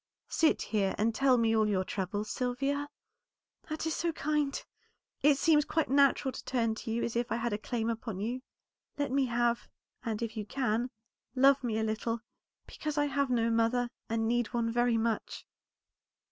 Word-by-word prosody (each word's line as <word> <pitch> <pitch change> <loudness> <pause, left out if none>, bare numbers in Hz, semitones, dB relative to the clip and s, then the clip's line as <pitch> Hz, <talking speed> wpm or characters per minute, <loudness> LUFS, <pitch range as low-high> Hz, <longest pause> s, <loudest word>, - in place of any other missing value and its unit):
Sit 320 -1 +2
here, 200 -3 0
and 225 +2 +2
tell 260 +1 +4
me 225 -1 +3
all 215 -1 +3
your 190 -2 +1
trouble, 195 +2 -2
Sylvia?" 275 +5 -2 0.8
"That 310 +1 -3
is 320 - 0
so 340 0 0
kind! 295 -1 0 0.6
It 285 0 +5
seems 300 0 +4
quite 320 -1 -1
natural 275 -1 +4
to - - -8
turn 230 -3 0
to 220 +2 -7
you 230 +1 0
as 235 - -2
if 240 0 -1
I - - +2
had 235 -1 -1
a 205 - -1
claim 225 0 -2
upon 225 -3 -3
you. 240 +5 -2 0.6
Let 285 -2 -1
me 270 0 +3
have, 235 0 +1 0.4
and 225 -2 -2
if 225 -1 -4
you 215 - -3
can, 240 +1 -1 0.5
love 270 +1 +5
me 225 -3 -1
a 220 - 0
little, 220 +1 -2 0.4
because 305 -1 -5
I 290 - +3
have 280 -1 0
no 230 -2 +2
mother, 235 +2 +2 0.2
and 225 0 0
need 240 0 +1
one 230 -1 +1
very 240 0 +2
much." 225 0 -2
240 Hz, 185 wpm, -31 LUFS, 225-275 Hz, 0.8 s, It